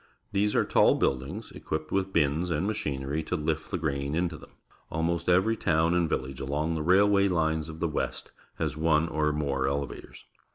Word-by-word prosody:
These 105 Hz, +1 st, +1 dB
are -, -, +3 dB
tall -, -, +4 dB
buildings, 65 Hz, 0 st, -2 dB
equipped 80 Hz, 0 st, -5 dB
with 95 Hz, 0 st, 0 dB
bins 80 Hz, +1 st, +1 dB
and 80 Hz, +2 st, 0 dB
machinery 75 Hz, -8 st, -2 dB
to 80 Hz, -, -3 dB
lift 80 Hz, -1 st, -2 dB
the -, -, -1 dB
grain 70 Hz, -2 st, -2 dB
into 85 Hz, 0 st, 0 dB
them. -, -, -13 dB, 0.4 s
Al 80 Hz, +1 st, -1 dB
most 85 Hz, +1 st, 0 dB
every 95 Hz, +6 st, +4 dB
town 80 Hz, -4 st, +2 dB
and 85 Hz, -2 st, +2 dB
village 65 Hz, -1 st, -3 dB
along 75 Hz, +4 st, -1 dB
the 80 Hz, -, -2 dB
railway 100 Hz, +4 st, +4 dB
Unes 80 Hz, -2 st, 0 dB
of 80 Hz, 0 st, -8 dB
the 85 Hz, -, +1 dB
West 75 Hz, -, -3 dB, 0.2 s
has -, -, -2 dB
one 80 Hz, 0 st, +2 dB
or 75 Hz, -1 st, 0 dB
more 70 Hz, -3 st, -1 dB
elevators. 70 Hz, -1 st, -4 dB
80 Hz, 190 wpm, -28 LUFS, 75-90 Hz, 0.4 s, tall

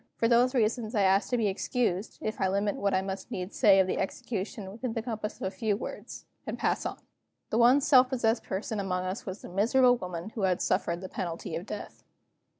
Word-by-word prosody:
For 230 Hz, -, +2 dB
these 245 Hz, +3 st, +4 dB
reasons 230 Hz, 0 st, 0 dB
I 205 Hz, -, +3 dB
ask 195 Hz, +1 st, +3 dB
to 245 Hz, -, +1 dB
be 225 Hz, -, +1 dB
excused, 200 Hz, 0 st, -1 dB
if 215 Hz, -1 st, -3 dB
I 190 Hz, -, +3 dB
limit 200 Hz, +2 st, 0 dB
what 200 Hz, -1 st, +1 dB
I 190 Hz, -, +1 dB
must 190 Hz, 0 st, -5 dB
needs 185 Hz, +1 st, -5 dB
say 195 Hz, -2 st, +6 dB
of 190 Hz, -, +5 dB
the 185 Hz, -, -2 dB
execution 200 Hz, 0 st, -4 dB
within 230 Hz, +3 st, -4 dB
the 225 Hz, -, -3 dB
compass 220 Hz, -3 st, -4 dB
of -, -, -7 dB
a 190 Hz, -, -1 dB
few 205 Hz, +1 st, -1 dB
words -, -, -7 dB, 0.2 s
and -, -, -3 dB
pass -, -, 0 dB
on. -, -, -6 dB, 0.5 s
The 225 Hz, -, +2 dB
one 250 Hz, +4 st, +6 dB
self 260 Hz, -2 st, +6 dB
possessed 235 Hz, -3 st, +1 dB
person 205 Hz, +2 st, -3 dB
among 185 Hz, -2 st, -1 dB
us 185 Hz, +4 st, -4 dB
was 190 Hz, +1 st, -6 dB
the -, -, -8 dB
miserable 245 Hz, +7 st, +4 dB
woman 180 Hz, 0 st, -6 dB
who 220 Hz, -, -4 dB
suffered 170 Hz, -1 st, 0 dB
the 190 Hz, -, -5 dB
penalty 165 Hz, -2 st, -4 dB
of 170 Hz, +5 st, -5 dB
death. 210 Hz, -, -7 dB
205 Hz, 220 wpm, -29 LUFS, 190-235 Hz, 0.5 s, say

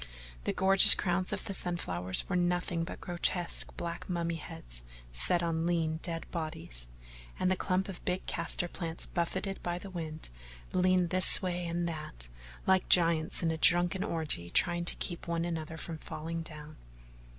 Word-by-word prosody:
The -, -, +1 dB
gorgeous 195 Hz, 0 st, +9 dB
crowns 180 Hz, -1 st, -1 dB
of -, -, -4 dB
the 195 Hz, -, -4 dB
sun 180 Hz, -2 st, -1 dB
flowers 90 Hz, -, +2 dB
were 185 Hz, -, -2 dB
nothing 175 Hz, -1 st, 0 dB
but 165 Hz, -, -7 dB
grotesque 175 Hz, 0 st, -1 dB
black 170 Hz, +2 st, -5 dB
mummy 170 Hz, -1 st, -1 dB
heads -, -, -3 dB, 0.3 s
set 175 Hz, -, +2 dB
on 165 Hz, 0 st, -1 dB
lean, 165 Hz, -2 st, 0 dB
dead 165 Hz, -2 st, -3 dB
bodies, 155 Hz, -, -4 dB, 0.5 s
and 185 Hz, -, +1 dB
the -, -, +3 dB
clump 185 Hz, +1 st, -1 dB
of 190 Hz, -3 st, -7 dB
big 180 Hz, +1 st, -2 dB
castor 175 Hz, -, -2 dB
plants, 165 Hz, -1 st, -5 dB
buffeted 190 Hz, +3 st, -3 dB
by 175 Hz, 0 st, -2 dB
the 195 Hz, +2 st, -9 dB
wind, 160 Hz, -, -6 dB, 0.4 s
leaned 185 Hz, -1 st, +2 dB
this 185 Hz, +1 st, +6 dB
way 180 Hz, -1 st, -2 dB
and 170 Hz, +1 st, -2 dB
that 150 Hz, -, -6 dB, 0.4 s
like 190 Hz, -1 st, +2 dB
giants 165 Hz, -2 st, +3 dB
in 165 Hz, -, +2 dB
a 160 Hz, -, -4 dB
drunken 175 Hz, +3 st, +4 dB
orgy 160 Hz, -, -3 dB
trying 175 Hz, -, +2 dB
to -, -, +2 dB
keep 175 Hz, -2 st, -5 dB
one 170 Hz, 0 st, -1 dB
another 160 Hz, -2 st, -4 dB
from 165 Hz, -1 st, -6 dB
falling 165 Hz, +2 st, -5 dB
down. 155 Hz, -1 st, -10 dB
170 Hz, 170 wpm, -31 LUFS, 160-180 Hz, 0.5 s, gorgeous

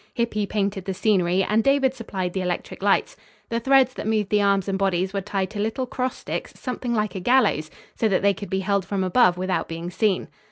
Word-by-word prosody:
Hippy 215 Hz, -3 st, -1 dB
painted 200 Hz, -2 st, -2 dB
the 190 Hz, -, -3 dB
scenery 185 Hz, -3 st, +2 dB
and 215 Hz, +3 st, +2 dB
David 275 Hz, -1 st, +3 dB
supplied 190 Hz, -7 st, -4 dB
the 190 Hz, -, -1 dB
electric 180 Hz, +1 st, -4 dB
lights. 200 Hz, 0 st, +2 dB, 0.3 s
The 230 Hz, -, 0 dB
threads 265 Hz, +1 st, +4 dB
that -, -, -5 dB
moved 215 Hz, -2 st, 0 dB
the 210 Hz, -1 st, +3 dB
arms 200 Hz, -1 st, +2 dB
and 195 Hz, -, 0 dB
bodies 190 Hz, -1 st, 0 dB
were 200 Hz, -, -1 dB
tied 195 Hz, -1 st, -2 dB
to 205 Hz, -, -6 dB
little 220 Hz, +5 st, -1 dB
cross 255 Hz, 0 st, -3 dB
sticks -, -, -6 dB
something 250 Hz, -2 st, -3 dB
like 210 Hz, -3 st, 0 dB
a 190 Hz, -, -4 dB
gallows, 205 Hz, -, +2 dB, 0.3 s
so 225 Hz, -, +1 dB
that 195 Hz, -2 st, +1 dB
they 200 Hz, 0 st, +4 dB
could 195 Hz, +1 st, -8 dB
be 190 Hz, 0 st, -1 dB
held 200 Hz, 0 st, +1 dB
from 195 Hz, +1 st, -2 dB
above 185 Hz, -1 st, +4 dB
without 185 Hz, +1 st, -1 dB
being 165 Hz, +2 st, -5 dB
seen." 205 Hz, -1 st, 0 dB
200 Hz, 225 wpm, -24 LUFS, 190-225 Hz, 0.3 s, threads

